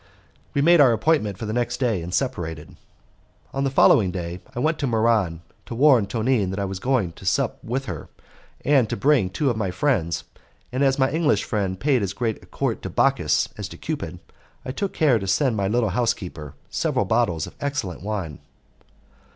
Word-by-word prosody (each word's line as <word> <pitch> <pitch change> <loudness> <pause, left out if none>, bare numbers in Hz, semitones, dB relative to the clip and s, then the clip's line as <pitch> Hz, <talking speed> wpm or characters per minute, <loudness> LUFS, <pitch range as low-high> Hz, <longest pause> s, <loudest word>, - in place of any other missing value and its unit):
We 140 - +2
made 170 0 +6
our 130 -4 +6
appointment 110 - +1
for 110 - -5
the 110 - -3
next 120 +1 -1
day, 115 -8 +1
and 85 +2 -6
separated. 90 -6 -3 0.8
On 135 - -1
the 135 - +1
following 105 -7 +5
morning 85 -1 -5 0.2
I - - -3
went 155 +4 +1
to 140 - 0
Muran 110 -8 +1 0.3
to 115 - -5
warn 130 -5 +5
Tonine 110 -1 +1
that 95 - -4
I 100 - 0
was 95 -1 -5
going 125 -7 0
to 85 - -15
sup 90 - 0
with 130 +4 -3
her, 80 - -6 0.6
and 135 -6 +4
to - - -2
bring 130 -4 +3
two 135 +8 0
of 115 - -4
my 105 -4 -1
friends; 90 - 0 0.5
and 130 +3 0
as 135 -1 +3
my 130 0 +2
English 155 -1 +2
friend 95 -4 -2
paid 135 -4 +2
as 100 -1 -2
great 115 0 -3
court - - -2
to - - -5
Bacchus - - +2
as - - -3
to - - -10
Cupid, - - -4 0.5
I 130 - -3
took 195 +8 -3
care 140 -8 +3
to 95 - -5
send 125 +5 +2
my 100 -2 0
little 115 +1 +1
housekeeper 90 - -2 0.2
several - - 0
bottles 95 -7 +1
of - - -11
excellent 140 - -3
wine. 95 -7 -4
115 Hz, 195 wpm, -23 LUFS, 95-135 Hz, 0.8 s, made